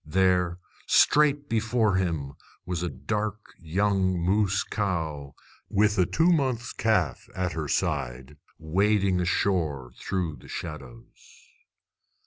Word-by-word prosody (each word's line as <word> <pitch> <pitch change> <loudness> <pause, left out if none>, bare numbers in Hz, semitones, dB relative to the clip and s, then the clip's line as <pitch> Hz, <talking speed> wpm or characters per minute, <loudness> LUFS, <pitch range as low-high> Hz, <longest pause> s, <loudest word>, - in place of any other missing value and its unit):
There, 90 +1 +2 0.3
straight 145 -1 +4
before 110 -2 +1
him, 80 -7 -2 0.3
was 90 -2 -3
a 90 - -1
dark 105 - -4
young 95 +2 +1
moose 100 +3 +1
cow, 80 -9 -3 0.3
with 105 +1 +3
a 90 - +4
two 165 - +3
months 130 -7 0
calf 110 -9 0
at 90 -2 -1
her 80 -2 -3
side, 65 +2 -2 0.2
wading 95 +3 +1
ashore 80 -8 0
through 85 -6 -2
the - - -15
shadows. 115 - -9
95 Hz, 110 wpm, -26 LUFS, 80-105 Hz, 0.3 s, straight